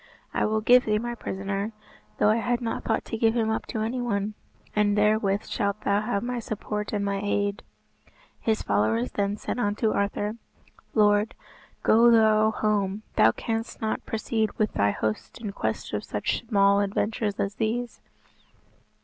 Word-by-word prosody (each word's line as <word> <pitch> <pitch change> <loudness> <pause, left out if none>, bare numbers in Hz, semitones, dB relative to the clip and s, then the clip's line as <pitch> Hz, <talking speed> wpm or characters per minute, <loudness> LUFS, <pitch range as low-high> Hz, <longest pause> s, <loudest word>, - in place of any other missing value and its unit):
"I - - +1
will 215 0 0
give 245 +3 +6
thee 215 -1 +2
my 240 +2 -3
prisoner, 200 -1 -3 0.4
though 210 - +4
I 220 - +2
had 245 +1 0
not 230 -2 -3
thought 220 - -1
to 225 - -4
give 225 0 +3
him 220 -2 +1
up 220 - -2
to 220 - -3
any 245 +3 -2
one; 210 -3 -1 0.4
and 210 -1 +2
therewith 210 -1 +2
shalt 200 -1 -2
thou 200 +1 +1
have 215 -1 -1
my 245 0 -2
support 210 -1 -4
and 205 -1 -1
my 200 0 -1
aid." 205 0 0 0.8
His 220 -1 0
followers 110 +4 +1
then 200 0 -1
said 245 - -4
unto 215 0 +1
Arthur, 205 +2 -1 0.6
"Lord, 210 0 +3 0.5
go 230 +2 +6
thou 220 -1 +5
home, 210 -1 0
thou 110 - +6
canst 225 - -4
not 220 -1 -2
proceed 220 0 -1
with 215 -1 0
thy 100 0 +2
host 110 +1 -3
in 215 -3 -4
quest 110 - -3
of 105 - -2
such 105 - -2
small 200 -2 +4
adventures 205 +1 -1
as 195 +1 -1
these." 235 +2 -2
210 Hz, 165 wpm, -26 LUFS, 200-225 Hz, 0.8 s, give